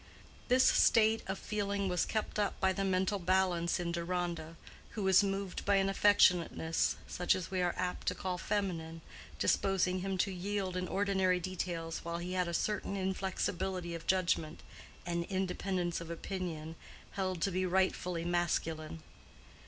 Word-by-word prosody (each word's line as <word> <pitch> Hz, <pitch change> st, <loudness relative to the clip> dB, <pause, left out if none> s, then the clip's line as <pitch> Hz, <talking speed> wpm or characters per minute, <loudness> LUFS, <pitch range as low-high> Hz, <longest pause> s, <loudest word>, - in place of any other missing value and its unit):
This 255 Hz, +1 st, +5 dB
state 225 Hz, 0 st, +5 dB
of 190 Hz, +1 st, -2 dB
feeling 200 Hz, -1 st, -2 dB
was 180 Hz, -1 st, 0 dB
kept 215 Hz, -1 st, -2 dB
up 205 Hz, -, 0 dB
by 190 Hz, 0 st, +3 dB
the 195 Hz, -, -2 dB
mental 190 Hz, +1 st, +1 dB
balance 180 Hz, -2 st, +1 dB
in 170 Hz, -1 st, -2 dB
Deronda, 170 Hz, -1 st, -3 dB, 0.4 s
who 210 Hz, -, -1 dB
was 190 Hz, +1 st, +6 dB
moved 195 Hz, -1 st, -2 dB
by 200 Hz, -, +3 dB
an 195 Hz, 0 st, +3 dB
affectionateness 180 Hz, -5 st, +3 dB
such 180 Hz, -, +1 dB
as 185 Hz, -1 st, -5 dB
we 185 Hz, -1 st, 0 dB
are 175 Hz, -1 st, 0 dB
apt 180 Hz, 0 st, -3 dB
to -, -, +1 dB
call 180 Hz, -1 st, -3 dB
feminine, 165 Hz, -5 st, -2 dB, 0.4 s
disposing 185 Hz, -1 st, +2 dB
him 190 Hz, +1 st, -2 dB
to 195 Hz, +2 st, +1 dB
yield 190 Hz, 0 st, -2 dB
in 180 Hz, 0 st, -2 dB
ordinary 190 Hz, -2 st, +1 dB
details, 170 Hz, -2 st, -3 dB
while 170 Hz, 0 st, -4 dB
he 175 Hz, +1 st, -4 dB
had 180 Hz, -1 st, +1 dB
a -, -, -2 dB
certain 205 Hz, 0 st, -1 dB
inflexibility 185 Hz, -1 st, -2 dB
of 165 Hz, -1 st, -7 dB
judgment, 175 Hz, -4 st, +1 dB, 0.4 s
and 170 Hz, -1 st, -1 dB
independence 185 Hz, -2 st, -2 dB
of 165 Hz, -, -8 dB
opinion, 170 Hz, -2 st, -5 dB, 0.4 s
held 185 Hz, -2 st, -2 dB
to 195 Hz, -, +1 dB
be 185 Hz, +1 st, 0 dB
rightfully 180 Hz, -2 st, 0 dB
masculine. 165 Hz, -2 st, -1 dB
185 Hz, 155 wpm, -33 LUFS, 170-195 Hz, 0.4 s, was